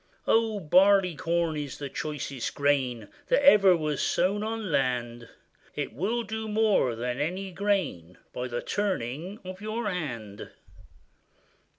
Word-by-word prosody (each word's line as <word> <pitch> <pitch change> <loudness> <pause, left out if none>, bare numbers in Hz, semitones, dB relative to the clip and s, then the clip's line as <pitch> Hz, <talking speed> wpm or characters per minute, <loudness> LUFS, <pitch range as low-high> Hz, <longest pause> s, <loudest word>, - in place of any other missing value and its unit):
O! 225 -2 +2
Barleycorn 170 -2 +3
is 145 -2 -5
the 145 - -5
choicest 140 -3 -4
grain 130 -6 0 0.2
That 275 +2 +2
ever 195 -9 +7
was 150 -3 -2
sown 200 +3 +1
on 220 -3 -3
land; 120 -4 -1 0.5
It - - -3
will 215 - -1
do 220 0 -5
more 210 - +2
than 125 +2 -3
any 185 +6 -2
grain, 180 - -1 0.2
By 125 0 -3
the 120 -1 -4
turning 185 - -2
of 185 +1 -8
your 215 +1 -3
hand. 120 - -5
170 Hz, 125 wpm, -27 LUFS, 130-205 Hz, 0.5 s, ever